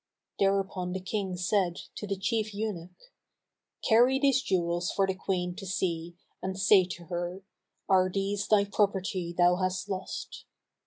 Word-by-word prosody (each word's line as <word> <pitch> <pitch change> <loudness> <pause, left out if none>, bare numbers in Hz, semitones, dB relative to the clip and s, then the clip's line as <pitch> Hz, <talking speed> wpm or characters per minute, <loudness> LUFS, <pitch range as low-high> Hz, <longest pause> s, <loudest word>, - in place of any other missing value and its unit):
Thereupon 195 -2 +1
the 190 - -2
King 190 -1 -3
said 180 -1 +1 0.2
to 210 - -5
the 195 -1 -2
chief 215 +1 -1
eunuch, 205 - -5 0.8
"Carry 245 +3 +5
these 275 -2 +3
jewels 175 -3 0
for 195 - +2
the 190 - -1
Queen 180 -1 -2
to 195 -2 -7
see, 170 -2 -2 0.3
and 190 0 -3
say 190 -1 +6
to 175 -1 -7
her, 175 +2 -4 0.4
'Are 185 -2 +4
these 200 +1 -1
thy 205 -2 +4
property 190 -3 0
thou 175 0 +5
hast 185 +1 -1
lost?'" 190 -1 -5
190 Hz, 150 wpm, -29 LUFS, 180-205 Hz, 0.8 s, say